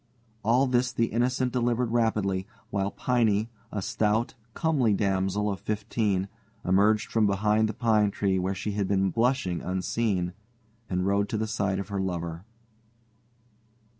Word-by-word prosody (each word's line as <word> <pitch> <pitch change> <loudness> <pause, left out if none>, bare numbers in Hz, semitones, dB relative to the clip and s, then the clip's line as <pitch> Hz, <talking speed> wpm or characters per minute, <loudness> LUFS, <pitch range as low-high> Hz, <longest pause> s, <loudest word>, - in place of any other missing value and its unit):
All 120 +5 +4
this 125 -1 +1
the 115 -2 0
Innocent 125 +1 +1
delivered 120 -1 +1
rapidly, 105 -5 +1 0.2
while 100 -1 0
Piney, 115 -2 +1 0.2
a 100 -3 -3
stout, 110 +4 0 0.2
comely 135 -10 +2
damsel 95 +1 0
of 100 - -4
fifteen, 105 -2 -1 0.4
emerged 105 +4 +3
from 110 -2 +3
behind 105 +2 +2
the - - -3
pine 110 -3 +3
tree, 95 -1 0
where 95 +2 -1
she 105 - -3
had 100 -1 -1
been 95 -1 +1
blushing 115 -6 +1
unseen, 95 0 -1 0.6
and 90 0 0
rode 100 +1 +1
to 110 - -1
the 110 - 0
side 100 -3 -1
of 100 +1 -5
her 100 -1 -2
lover. 85 -1 -4
105 Hz, 145 wpm, -27 LUFS, 95-115 Hz, 0.6 s, All